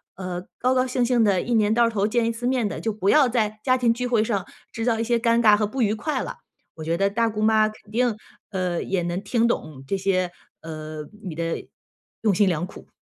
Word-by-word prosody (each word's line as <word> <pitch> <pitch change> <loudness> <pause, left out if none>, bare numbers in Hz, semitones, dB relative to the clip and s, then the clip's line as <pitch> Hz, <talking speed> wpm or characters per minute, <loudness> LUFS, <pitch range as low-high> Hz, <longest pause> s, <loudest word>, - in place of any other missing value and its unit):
呃， 180 -1 -4 0.2
高 255 +1 +2
高 255 0 +2
兴 250 -1 +1
兴 240 -2 +3
地 200 -3 +3
一 240 - -2
年 215 -2 +3
到 235 +1 +4
头 210 -2 0
见 235 +1 +1
一 230 - +1
次 245 +2 -3
面 250 -4 +1
得， - - -5
就 225 - 0
不 205 -2 -1
要 290 -4 +5
在 215 -3 0
家 255 +1 +3
庭 235 -2 +3
聚 250 +1 -3
会 230 -3 +2
上 200 -5 -2 0.2
制 225 - -4 0.2
一 - - +1
些 235 0 +1
尴 230 0 +3
尬 215 -3 +6
和 210 0 0
不 250 +2 -1
愉 210 0 +2
快 295 +8 -2
了。 - - -6 0.4
我 160 - -8
觉 165 +2 0
得 195 +1 +2
大 230 +3 +1
姑 215 -1 -3
妈 215 0 +4
肯 215 -1 -12
定， 240 0 +1 0.4
呃， 180 -3 -1
也 190 -2 -1
能 175 +2 -2
听 230 +3 +1
懂 155 -9 -2
你 135 - -12
这 195 - -1
些， 185 -2 0 0.3
呃， 155 -1 -7 0.2
你 170 -5 -5
的 165 0 -3 0.5
用 215 -3 +3
心 200 +2 +3
良 170 -1 0
苦。 185 - -13
215 Hz, 260 characters per minute, -24 LUFS, 185-235 Hz, 0.5 s, 尬